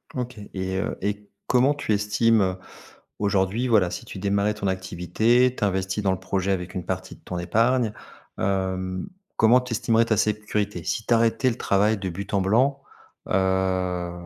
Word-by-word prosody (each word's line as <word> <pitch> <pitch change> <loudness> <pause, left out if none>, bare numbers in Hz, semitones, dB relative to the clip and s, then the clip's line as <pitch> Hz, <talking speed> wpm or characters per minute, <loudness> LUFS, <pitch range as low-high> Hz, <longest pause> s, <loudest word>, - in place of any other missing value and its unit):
OK. 125 -3 -4
Et, 95 0 -2
heu, 95 - -2
et 105 0 -3 0.2
comment 130 +3 +4
tu 145 -7 -1
estimes, 105 +2 +2
heu, 95 -1 +1 0.6
aujourd'hui, 100 +4 +1
voilà, 105 -7 +4
si 90 - -6
tu - - -8
démarrais 100 +2 +1
ton 100 -2 -3
activité, 95 +7 +1
tu - - -3
investis 95 +1 -1
dans 95 - +2
le 95 - -2
projet 95 +1 -1
avec 90 -1 -2
une 90 -3 -4
partie - - -4
de - - -23
ton 90 - -6
épargne, 115 +6 +2 0.5
hem, 95 - -1 0.3
comment 115 +3 +6
tu 125 -2 -5
estimerais 115 +1 +2
ta 110 -3 +1
sécurité? 105 -3 -1
Si 110 - -2
tu - - +2
arrêtais 115 +3 +3
le 115 - -4
travail 105 +3 +2
de 95 -1 -4
but 95 +4 -7
en 100 - +3
blanc, 130 +8 +2 0.5
heu, 95 -2 0
100 Hz, 175 wpm, -24 LUFS, 95-115 Hz, 0.6 s, comment